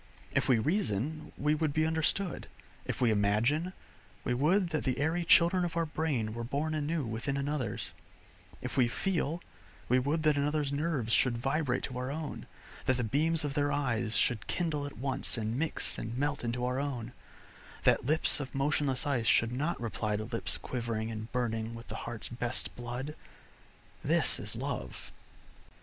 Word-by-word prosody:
If - - +1
we 125 - +6
reason, 150 - -1
we 150 +2 +2
would 155 -1 0
be 155 +1 +2
understood; 160 +3 0 0.4
if - - -3
we 120 -3 +4
imagine, 110 - +2 0.5
we 125 - 0
would 170 +9 +3
that 155 -2 -1
the 130 -2 0
airy 160 +5 0
children 170 +2 +5
of 170 -1 -2
our 165 - +2
brain 150 -9 -1
were 115 +1 -4
born 145 +6 -1
anew 155 -1 -1
within 115 +5 -2
another's; 140 -6 -2 0.7
if - - -4
we 125 -2 +5
feel, 165 +4 -1 0.4
we 125 +1 +4
would 150 +5 0
that 150 -2 +4
another's 145 0 0
nerves 140 -7 -1
should 125 -3 +3
vibrate 135 0 0
to 125 -2 -3
our 125 +1 -3
own, 155 0 -5 0.4
that 130 - +2
the 125 - -1
beams 155 +8 +3
of 145 - -2
their 145 0 +1
eyes 120 -6 0
should 115 -5 +1
kindle 150 -5 -1
at 145 - -10
once 130 -1 +1
and 110 +3 -2
mix 165 +1 0
and 115 +2 -5
melt 145 0 -1
into 120 +1 -1
our 125 +1 -1
own, 125 -4 -3 0.7
that - - +4
lips 155 +4 +7
of 135 -2 -6
motionless 140 -1 +1
ice 125 -6 0
should 115 +2 +4
not 145 +7 -1
reply 110 -2 -2
to 105 - -2
lips 115 +1 -1
quivering 115 -3 -3
and 110 0 -6
burning 115 -2 -2
with 115 0 -10
the - - -5
heart's 120 -2 -4
best 120 +1 -2
blood. 125 +4 -5 0.9
This - - +3
is - - -3
Love. - - -5
135 Hz, 175 wpm, -31 LUFS, 120-155 Hz, 0.9 s, lips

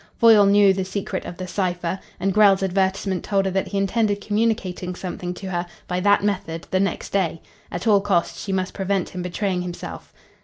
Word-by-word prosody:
Foyle 220 -3 +7
knew 200 -1 +6
the 190 0 -1
secret 190 +1 -4
of 175 - -7
the 185 - -5
cipher, 180 -1 -2 0.2
and 195 0 0
Grell's 200 -2 +5
advertisement 190 0 0
told 195 -1 +1
her 190 - 0
that 190 +1 -1
he 200 - -3
intended 205 +1 +1
communicating 205 -4 -1
something 180 -1 -5
to 190 0 -6
her 175 0 -2 0.2
by 180 0 -1
that 205 +2 +3
method 180 -5 -2
the 185 - +2
next 195 +1 -1
day. 180 -4 0 0.3
At 175 - -4
all 205 -3 +5
costs 190 -4 0
she 200 - -4
must 185 -1 -1
prevent 195 -2 -1
him 180 - -6
betraying 180 +1 -1
himself. 180 -1 -7
190 Hz, 195 wpm, -23 LUFS, 180-200 Hz, 0.3 s, Foyle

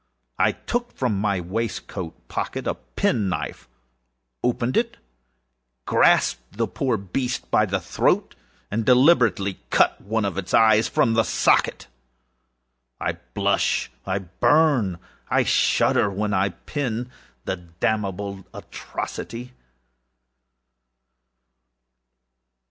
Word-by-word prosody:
I - - +4
took 240 0 -3
from 120 -7 0
my 100 -3 +1
waistcoat 95 -2 -5
pocket - - -4
a - - 0
pen 65 - -1
knife, 90 - -5 0.7
opened 125 0 0
it, 230 0 0 0.9
grasped 100 - +2
the 115 -1 +1
poor 130 -4 -1
beast 120 +7 -3
by 110 - +4
the 100 0 0
throat, 85 - 0 0.4
and 110 +2 0
deliberately 125 - +4
cut - - +3
one 110 +1 -1
of 95 -1 -2
its 95 -1 -1
eyes 110 -1 +5
from 115 - +2
the 115 - +4
socket! - - +2 1.1
I - - -2 0.2
blush, - - +1
I 95 - -1
burn, 110 - +2 0.3
I - - +3
shudder, - - +3
while 105 +2 -2
I 95 +1 +2
pen 120 - -4 0.3
the - - -2
damnable 95 +3 -3
atrocity. 120 +2 -6
105 Hz, 105 wpm, -23 LUFS, 95-120 Hz, 1.1 s, eyes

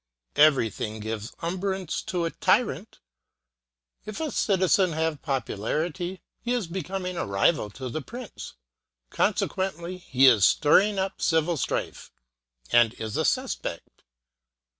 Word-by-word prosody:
Everything 115 -7 +3
gives 110 +1 -5
umbrage 185 0 -2
to 175 -2 -1
a 165 - -2
tyrant. - - 0 1.1
If 215 -1 -7
a 315 -3 -2
citizen 190 -4 +2
have 160 -1 -1
popularity, 150 - -3 0.2
he 240 +1 -1
is 240 -5 0
becoming 185 +1 -4
a - - -1
rival 100 +4 +2
to 130 -1 -5
the 140 +6 -4
prince. 240 - -9 0.6
Conse - - +1
quently, 185 -1 -4
he 135 -6 +3
is 115 -7 +6
stirring 195 - +4
up 190 0 -2
civil 160 0 +2
strife, 135 - -3 0.6
and 120 -1 +4
is 110 -1 -5
a - - +1
suspect. - - -2
165 Hz, 125 wpm, -26 LUFS, 130-190 Hz, 1.1 s, is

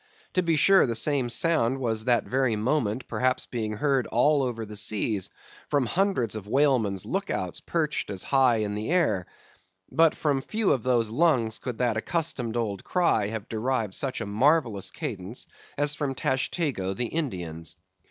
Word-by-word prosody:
To 185 - +3
be 170 -2 +1
sure 190 +3 +5
the 115 - -1
same 135 +1 +2
sound 130 -3 +2
was 115 -4 -2
that 120 -2 +3
very 130 -3 0
moment 120 0 -1
perhaps 130 0 0
being 110 -3 -3
heard 135 +3 +1
all 145 +5 +3
over 120 -4 -2
the 105 0 -9
seas, 105 -1 0 0.4
from 145 -3 +2
hundreds 170 - 0
of 105 -2 -7
whalemen's 120 -7 +2
look - - -2
outs - - -3
perched - - -2
as 95 -3 -3
high 130 -3 +3
in 105 -2 -1
the 105 +4 -4
air; 130 - +1 0.6
but 165 -1 +4
from 140 -3 0
few 215 +6 0
of 130 - +1
those 120 -3 +1
lungs 125 -5 +2
could 125 -3 -5
that 120 -3 +1
accustomed 125 -4 -1
old 105 -5 -2
cry 170 - +1
have 110 0 -5
derived 115 -2 -1
such 135 +4 -3
a - - -2
marvellous 115 - +2
cadence 115 - -5 0.3
as 145 0 +3
from 145 -3 -3
Tashtego 130 - -1
the 120 - -1
Indian's. 90 - -4
125 Hz, 170 wpm, -26 LUFS, 110-145 Hz, 0.6 s, sure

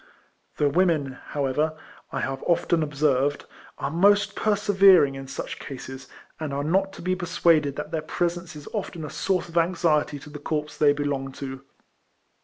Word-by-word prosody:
The 150 - +3
women, 160 -3 +2
however, 150 +3 -1 0.3
I - - -2
have 135 0 -3
often 170 -1 +2
observed, 145 -2 +1 0.3
are - - -3
most 200 +4 +4
persevering 195 -7 +5
in 135 0 -7
such - - -6
cases, 130 0 -8 0.3
and 155 -3 -3
are 140 - -1
not 190 +5 +1
to - - -10
be 185 +1 +1
persuaded 165 -5 +2
that 150 +2 -5
their 160 -2 -1
presence 175 +1 -2
is 150 -1 -10
often 175 -6 -4
a 150 - -7
source 185 +2 -1
of 170 0 +1
anx 170 +1 -1
iety 150 -3 +2
to 150 - -11
the 150 - -8
corps 150 0 -3
they 150 -1 +5
belong 140 -2 -2
to. 135 -1 -7
155 Hz, 170 wpm, -25 LUFS, 145-175 Hz, 0.3 s, persevering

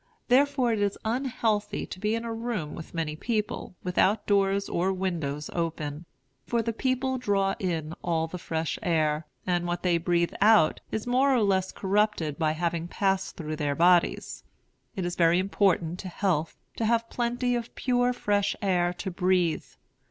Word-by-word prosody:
Therefore 260 -2 +3
it 215 - -1
is 200 -1 0
unhealthy 230 -3 -1
to 185 - -9
be 210 +3 0
in 230 +1 -3
a 230 - -3
room 225 -10 -3
with 165 +1 -9
many 160 -2 -2
people, 215 0 -3
without 190 +3 +2
doors 200 -1 +2
or 180 +3 0
windows 165 -6 -2
open; 160 -2 -3 0.4
for 235 -1 +1
the 230 - -2
people 260 +2 0
draw 195 -4 +1
in 165 -4 -2
all 165 -2 +1
the 180 +2 -7
fresh 160 -1 -3
air, 155 -5 +1 0.2
and 175 -1 0
what 175 0 -3
they 175 -2 +2
breathe 170 0 +1
out 210 -6 +5
is 220 - -2
more 255 +3 +3
or 245 -4 +3
less 190 -2 +1
corrupted 195 -6 0
by 155 -1 +2
having 170 0 -2
passed 195 +1 -1
through 155 -3 -4
their 145 -2 -1
bodies. 175 +1 +2 0.5
It 190 -3 -2
is 175 - -2
very 170 0 +4
important 185 -3 +1
to 190 - -6
health 175 -4 -1 0.2
to 225 - 0
have 230 +1 +1
plenty 245 +1 0
of 235 -1 -3
pure 245 -1 +2
fresh 205 -4 0
air 180 -3 +1
to 190 +2 -5
breathe. 180 -2 +1
190 Hz, 170 wpm, -27 LUFS, 170-225 Hz, 0.5 s, out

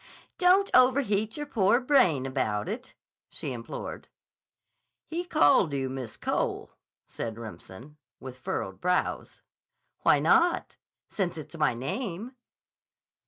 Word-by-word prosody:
"Don't 375 +2 +4
overheat 240 -5 +3
your 295 - -4
poor 225 -4 +3
brain 185 - +3
about 130 -3 -1
it," 240 +6 -6 0.3
she - - -4
implored. - - -7 1.0
"He 335 +2 -3
called 150 - +4
you 135 -2 -2
Miss 130 -4 -6
Cole," - - -2 0.3
said 115 -1 -6
Remsen, 115 - -10 0.2
with 130 -1 -9
furrowed - - -4
brows. - - -1 0.6
"Why - - +4
not, 335 - +2 0.3
since 180 -4 -2
it's 155 0 -9
my 150 -6 +1
name?" 195 - -4
175 Hz, 115 wpm, -28 LUFS, -, 1.0 s, Don't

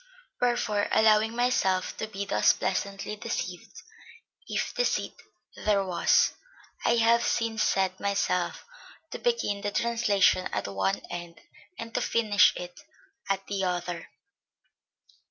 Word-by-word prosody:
Wherefore, 235 -4 +1
allowing 220 +1 +4
myself 215 -7 +1
to 220 - -3
be 200 -2 -5
thus - - +3
pleasantly 200 +1 -3
deceived, - - -5 0.6
if - - -2
deceit - - 0 0.4
there 200 -2 +1
was, 180 -2 +3 0.5
I 235 - +3
have 235 +1 +4
since 225 -2 0
set 190 -2 +1
myself 195 -3 -1 0.5
to - - -6
begin 470 - 0
the 205 - -1
translation 210 -4 +2
at - - -2
one 95 -1 -1
end 175 -1 -7 0.4
and 230 0 -7
to - - 0
finish 210 -3 +4
it 180 +8 -8 0.5
at 195 0 -1
the 195 -1 -3
other...." 180 -2 -3
205 Hz, 120 wpm, -27 LUFS, 185-230 Hz, 0.6 s, allowing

